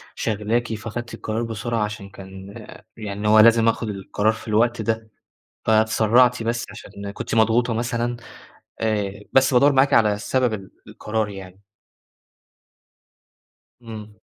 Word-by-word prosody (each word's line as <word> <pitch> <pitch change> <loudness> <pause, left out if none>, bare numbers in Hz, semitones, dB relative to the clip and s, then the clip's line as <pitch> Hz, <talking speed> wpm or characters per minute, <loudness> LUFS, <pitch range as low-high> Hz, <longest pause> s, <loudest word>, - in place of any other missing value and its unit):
شاغلاكِ 115 +2 -1
فخدتِ 115 +2 -6
القرار 110 +2 -3
بسرعة 115 +1 -3
علشان 105 -1 -5
كان 95 0 -11 0.4
يعني 105 -1 -4
هو 110 +1 +6
لازم 115 +1 +6
آخد 115 0 0
القرار 105 +2 0
في 110 - -11
الوقت 115 +2 +2
ده، 110 0 -2 0.6
فاتسرعتِ 110 +2 +3
بس 115 +1 -1
علشان 100 -1 -9
كنتِ 100 - -5
مضغوطة 115 +2 +3
مثلًا؟ 120 +1 -2 0.6
آآ 105 -3 -1
بس 130 0 +4
بادوّر 140 +4 +5
معاكِ 135 +1 +3
على 105 -4 +4
سبب 125 +2 0
ال 95 -2 -8 0.2
القرار 110 0 -3
يعني. 95 -1 -11 2.2
إمم. 110 -2 -9
110 Hz, 125 wpm, -22 LUFS, 105-115 Hz, 2.2 s, هو